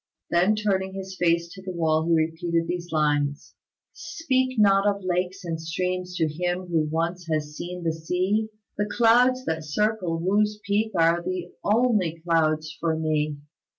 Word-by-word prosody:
Then 180 Hz, +5 st, +3 dB
turning 190 Hz, -2 st, -1 dB
his 190 Hz, 0 st, -6 dB
face 170 Hz, -1 st, +2 dB
to 190 Hz, -, -11 dB
the 190 Hz, -, -7 dB
wall, 160 Hz, -1 st, +1 dB
he 170 Hz, -, +4 dB
repeated 165 Hz, +1 st, 0 dB
these 175 Hz, 0 st, -4 dB
lines: 145 Hz, -2 st, 0 dB, 0.4 s
"Speak 265 Hz, -7 st, -1 dB
not 200 Hz, -1 st, +5 dB
of 200 Hz, -1 st, 0 dB
lakes 180 Hz, +1 st, -2 dB
and 165 Hz, -1 st, -3 dB
streams 180 Hz, +2 st, -3 dB
to 160 Hz, -3 st, +1 dB
him 175 Hz, +4 st, -2 dB
who 160 Hz, -3 st, 0 dB
once 170 Hz, +2 st, -2 dB
has 150 Hz, -2 st, -2 dB
seen 180 Hz, +2 st, -6 dB
the 165 Hz, -1 st, 0 dB
sea; 185 Hz, +7 st, -1 dB, 0.3 s
The 205 Hz, 0 st, 0 dB
clouds 250 Hz, +2 st, +4 dB
that 160 Hz, 0 st, -2 dB
circle 180 Hz, +1 st, 0 dB
Wu's 210 Hz, +4 st, +1 dB
peak 210 Hz, +2 st, +1 dB
are 165 Hz, +1 st, +4 dB
the 180 Hz, 0 st, -4 dB
only 210 Hz, -7 st, +2 dB
clouds 155 Hz, -2 st, +1 dB
for 165 Hz, -1 st, 0 dB
me." 155 Hz, -2 st, -1 dB
175 Hz, 160 wpm, -25 LUFS, 160-200 Hz, 0.4 s, not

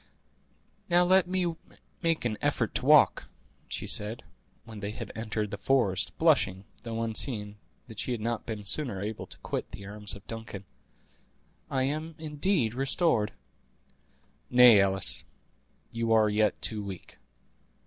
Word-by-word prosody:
"Now 175 Hz, 0 st, +5 dB
let 185 Hz, +1 st, +4 dB
me 180 Hz, -2 st, -1 dB, 0.5 s
make 165 Hz, -5 st, 0 dB
an 110 Hz, -3 st, 0 dB
effort -, -, 0 dB
to -, -, -2 dB
walk," -, -, +5 dB, 0.4 s
she -, -, -4 dB
said, 105 Hz, +3 st, 0 dB, 0.4 s
when 110 Hz, -2 st, -10 dB
they 100 Hz, 0 st, -4 dB
had 110 Hz, +1 st, -7 dB
entered 110 Hz, -2 st, -3 dB
the 100 Hz, -, -5 dB
forest, 100 Hz, -6 st, +1 dB
blushing, 140 Hz, -, +2 dB, 0.2 s
though 115 Hz, -1 st, -4 dB
unseen, 110 Hz, -2 st, -2 dB, 0.3 s
that 110 Hz, -3 st, -10 dB
she -, -, -2 dB
had 120 Hz, -, -2 dB
not 115 Hz, +1 st, -3 dB
been 110 Hz, -3 st, -5 dB
sooner 120 Hz, -2 st, -1 dB
able 105 Hz, +2 st, -5 dB
to -, -, -10 dB
quit -, -, -4 dB
the 100 Hz, -, -10 dB
arms 105 Hz, 0 st, -4 dB
of 100 Hz, -, -14 dB
Duncan; 110 Hz, -4 st, -8 dB, 1.0 s
"I 130 Hz, -1 st, 0 dB
am 155 Hz, +4 st, -3 dB
indeed 150 Hz, -, 0 dB
restored." 135 Hz, -4 st, +2 dB, 1.2 s
"Nay, 125 Hz, -4 st, +8 dB
Alice, 95 Hz, 0 st, +3 dB, 0.7 s
you 115 Hz, 0 st, -2 dB
are 110 Hz, -1 st, +4 dB
yet 105 Hz, 0 st, +1 dB
too 105 Hz, -2 st, -2 dB
weak." 95 Hz, -3 st, -9 dB
115 Hz, 145 wpm, -28 LUFS, 105-135 Hz, 1.2 s, Nay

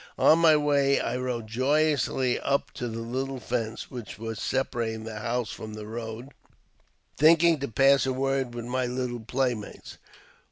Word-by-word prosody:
On 160 Hz, -, +5 dB
my 165 Hz, -2 st, +6 dB
way 140 Hz, -2 st, +2 dB
I 120 Hz, -, -2 dB
rode 125 Hz, -3 st, -3 dB
joyously 130 Hz, +1 st, +1 dB
up 140 Hz, 0 st, 0 dB
to 120 Hz, -, -5 dB
the 115 Hz, 0 st, -5 dB
little 130 Hz, +3 st, -3 dB
fence 115 Hz, -2 st, -4 dB
which 120 Hz, -6 st, -8 dB, 0.2 s
separated 115 Hz, -2 st, -2 dB
the 110 Hz, -1 st, -6 dB
house 120 Hz, 0 st, -2 dB
from 110 Hz, -1 st, -8 dB
the 105 Hz, -1 st, -7 dB
road, 115 Hz, +3 st, -6 dB, 0.9 s
thinking 165 Hz, +1 st, +5 dB
to 140 Hz, -, -3 dB
pass 135 Hz, +4 st, +4 dB
a 130 Hz, -, 0 dB
word 135 Hz, -2 st, -1 dB
with 120 Hz, -1 st, -5 dB
my 125 Hz, +1 st, -1 dB
little 125 Hz, -1 st, -3 dB
playmates. 120 Hz, -1 st, -3 dB
125 Hz, 155 wpm, -27 LUFS, 115-135 Hz, 0.9 s, my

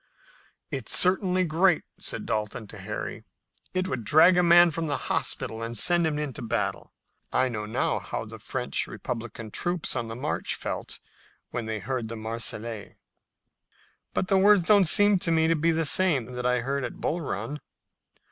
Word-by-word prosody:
"It's -, -, +1 dB
certainly 185 Hz, 0 st, +3 dB
great," 170 Hz, +1 st, +2 dB, 0.2 s
said -, -, -5 dB
Dalton 110 Hz, 0 st, -3 dB
to 110 Hz, -, -10 dB
Harry. 105 Hz, +3 st, -6 dB, 0.5 s
"It 185 Hz, 0 st, 0 dB
would 130 Hz, -7 st, -3 dB
drag 160 Hz, -, +6 dB
a 180 Hz, -, +4 dB
man 175 Hz, 0 st, +6 dB
from 165 Hz, +1 st, -3 dB
the 145 Hz, -2 st, 0 dB
hospital 110 Hz, -3 st, -3 dB
and 115 Hz, +1 st, -3 dB
send 175 Hz, -2 st, +3 dB
him 150 Hz, -2 st, -2 dB
into 150 Hz, -4 st, -4 dB
battle. 115 Hz, -2 st, -3 dB, 0.4 s
I 130 Hz, 0 st, +2 dB
know 105 Hz, -3 st, -4 dB
now 110 Hz, -, 0 dB
how -, -, -5 dB
the -, -, -10 dB
French -, -, -2 dB
republican 115 Hz, -1 st, -6 dB
troops 175 Hz, 0 st, -2 dB
on 120 Hz, -2 st, -2 dB
the 115 Hz, -, -6 dB
march 135 Hz, +5 st, -2 dB
felt -, -, -5 dB, 0.5 s
when 115 Hz, -2 st, -4 dB
they 110 Hz, 0 st, -2 dB
heard 120 Hz, 0 st, -3 dB
the 115 Hz, -, -5 dB
Marseillaise." 110 Hz, -1 st, -4 dB, 1.2 s
"But 185 Hz, -, 0 dB
the 195 Hz, -1 st, +3 dB
words 200 Hz, -1 st, +5 dB
don't 200 Hz, +1 st, +5 dB
seem 205 Hz, +3 st, +5 dB
to 175 Hz, -, -2 dB
me 160 Hz, 0 st, +3 dB
to 165 Hz, -, +3 dB
be 165 Hz, +2 st, +1 dB
the 165 Hz, 0 st, +1 dB
same 155 Hz, -6 st, +2 dB
that 125 Hz, 0 st, -2 dB
I 125 Hz, -1 st, +2 dB
heard 135 Hz, +2 st, -2 dB
at -, -, -5 dB
Bull 170 Hz, +3 st, -2 dB
Run." 150 Hz, 0 st, -4 dB
145 Hz, 175 wpm, -26 LUFS, 115-175 Hz, 1.2 s, drag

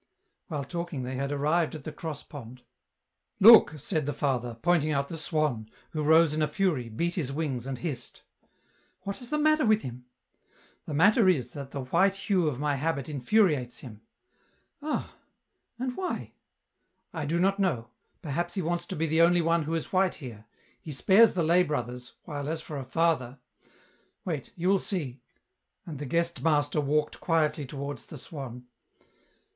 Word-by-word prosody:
While 150 Hz, -7 st, -3 dB
talking, 170 Hz, -3 st, -4 dB
they 125 Hz, +1 st, -4 dB
had 140 Hz, +2 st, -2 dB
arrived 155 Hz, +4 st, +1 dB
at 150 Hz, -, -8 dB
the 155 Hz, -, -5 dB
cross 155 Hz, -3 st, -6 dB
pond. 125 Hz, -3 st, -11 dB, 0.4 s
" -, -, -53 dB
Look," 220 Hz, -9 st, +8 dB
said 155 Hz, 0 st, -2 dB
the 145 Hz, -, -1 dB
father, 125 Hz, -4 st, -1 dB
pointing 165 Hz, -3 st, +3 dB
out 140 Hz, -1 st, 0 dB
the -, -, -5 dB
swan, 150 Hz, -9 st, -1 dB, 0.2 s
who 155 Hz, -, -2 dB
rose 160 Hz, +1 st, +5 dB
in 155 Hz, -, -1 dB
a 155 Hz, -, +3 dB
fury, 165 Hz, -, 0 dB
beat 170 Hz, +11 st, -1 dB
his 150 Hz, -7 st, -2 dB
wings, 135 Hz, -4 st, -3 dB
and 135 Hz, -1 st, -3 dB
hissed. 130 Hz, -5 st, -6 dB, 0.4 s
" -, -, -39 dB
What 200 Hz, +6 st, -5 dB
is 245 Hz, -, -9 dB
the 300 Hz, -, 0 dB
matter 310 Hz, 0 st, +3 dB
with 215 Hz, -2 st, +3 dB
him? 125 Hz, 0 st, -8 dB, 0.2 s
" -, -, -43 dB
" -, -, -32 dB
The 150 Hz, -, -3 dB
matter 200 Hz, -, +5 dB
is 130 Hz, -9 st, +1 dB
that 140 Hz, -2 st, -7 dB
the 140 Hz, -1 st, -5 dB
white 190 Hz, +8 st, +3 dB
hue 195 Hz, -4 st, +1 dB
of 140 Hz, -5 st, -1 dB
my 145 Hz, -1 st, 0 dB
habit 140 Hz, -1 st, -2 dB
infuriates 145 Hz, -, +1 dB
him." 110 Hz, -5 st, -11 dB, 0.4 s
" -, -, -42 dB
Ah! 300 Hz, +1 st, -3 dB, 0.6 s
and 255 Hz, +1 st, -2 dB
M?hy? 365 Hz, +8 st, -4 dB, 0.3 s
" -, -, -52 dB
" -, -, -49 dB
I 160 Hz, -3 st, -3 dB
do 165 Hz, +3 st, 0 dB
not 195 Hz, +2 st, +2 dB
know; 125 Hz, -, 0 dB, 0.3 s
perhaps 175 Hz, +3 st, -2 dB
he 190 Hz, -, -1 dB
wants 175 Hz, +2 st, -2 dB
to -, -, -5 dB
be 160 Hz, -, 0 dB
the 160 Hz, +1 st, +2 dB
only 175 Hz, 0 st, +5 dB
one 165 Hz, +1 st, +2 dB
who 165 Hz, +2 st, -1 dB
is 165 Hz, -, -4 dB
white 185 Hz, 0 st, +3 dB
here; 115 Hz, -7 st, -10 dB, 0.4 s
he 155 Hz, -, -8 dB
spares 200 Hz, -, +5 dB
the 175 Hz, -, 0 dB
lay 170 Hz, +3 st, +4 dB
brothers, 125 Hz, -6 st, -3 dB
while 145 Hz, -3 st, -5 dB
as 160 Hz, 0 st, -2 dB
for 150 Hz, -, -6 dB
a 135 Hz, -, -4 dB
father... 135 Hz, -2 st, 0 dB, 0.9 s
wait, 155 Hz, -7 st, -4 dB
you 180 Hz, +1 st, -2 dB
will 195 Hz, 0 st, +4 dB
see." 140 Hz, -12 st, -4 dB, 0.6 s
And 155 Hz, -5 st, -7 dB
the 145 Hz, -, -5 dB
guest 170 Hz, +3 st, 0 dB
master 150 Hz, -1 st, +2 dB
walked 150 Hz, +1 st, 0 dB
quietly 155 Hz, -4 st, +1 dB
towards 140 Hz, +1 st, -6 dB
tht 155 Hz, -, -9 dB
swan. 125 Hz, -4 st, -8 dB
155 Hz, 190 wpm, -28 LUFS, 135-175 Hz, 0.9 s, Look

